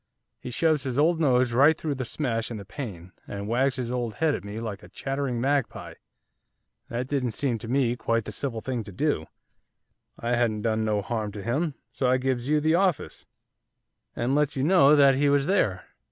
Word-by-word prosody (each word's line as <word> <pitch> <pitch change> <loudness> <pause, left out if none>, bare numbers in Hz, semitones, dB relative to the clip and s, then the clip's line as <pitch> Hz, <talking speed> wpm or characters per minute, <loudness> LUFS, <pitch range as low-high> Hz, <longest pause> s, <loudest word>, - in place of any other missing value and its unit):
He - - -7
shoves 155 +4 +2
his 130 -2 -3
old 160 +3 +3
nose 125 -5 +3
right 145 +6 +5
through 155 -3 -2
the 130 -2 -4
smash 115 -4 -2
in 115 - -5
the 100 - -8
pane, 95 - -7 0.2
and 100 0 -5
wags 130 +4 +1
his 125 -2 -3
old 120 -3 -2
head 160 0 +1
at 90 - -4
me 100 +1 -7
like 110 -3 -5
a - - -14
chattering 135 -3 -3
magpie. 140 +1 -1 1.0
That 120 +2 -3
didn't 130 -5 -1
seem 135 -7 -1
to 115 - -8
me 125 -1 +1
quite 115 -2 -1
the - - -5
civil 115 0 -3
thing 125 -2 -3
to 100 - -8
do, 130 - -1 0.9
I 120 - -3
hadn't 110 -3 0
done 110 -1 +1
no 105 -2 0
harm 110 -2 -3
to 100 -1 -7
him; 140 - -1 0.2
so 130 - 0
I 130 - +4
gives 130 0 -1
you 150 0 +3
the 155 +2 +2
office, 185 -2 0 0.9
and 120 +3 0
lets 150 0 +2
you 130 - 0
know 150 -3 +6
that 140 -2 +6
he 140 +2 +2
was 140 -1 +3
there. 110 - +1
125 Hz, 205 wpm, -26 LUFS, 115-145 Hz, 1.0 s, know